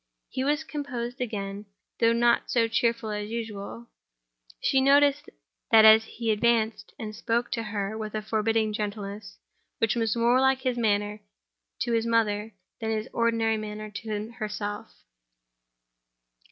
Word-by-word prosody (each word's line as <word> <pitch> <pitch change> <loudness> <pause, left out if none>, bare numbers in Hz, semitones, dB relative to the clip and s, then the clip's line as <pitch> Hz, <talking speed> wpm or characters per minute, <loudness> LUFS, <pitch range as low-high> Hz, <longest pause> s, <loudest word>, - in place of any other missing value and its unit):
He 260 - -2
was 295 +3 +1
composed 255 -5 -5
again, 205 -3 -4 0.3
though 230 0 +4
not 235 0 +2
so 230 -2 +3
cheerful 230 -1 0
as 210 0 -4
usual. 225 0 -6 0.7
She 265 - +2
noticed 285 +2 +4 0.4
that 220 -1 +8 0.2
he 225 0 -3
advanced 225 0 +1
and 215 -1 -6
spoke 235 +2 -1
to 230 - -1
her 210 -1 -3
with 215 -1 -5
a 215 - -2
forbearing 220 0 0
gentleness, 205 -1 -5 0.4
which 225 -1 +2
was 225 -2 0
more 240 +2 +3
like 265 0 +3
his 255 -2 0
manner 210 -2 0 0.6
to 240 - 0
her 230 0 +1
mother 215 -2 +1 0.2
than 220 - -3
his 220 +2 -2
ordinary 230 -1 +1
manner 215 0 -6
to 215 +1 -5
herself. 210 -1 -4
225 Hz, 140 wpm, -27 LUFS, 210-235 Hz, 0.7 s, that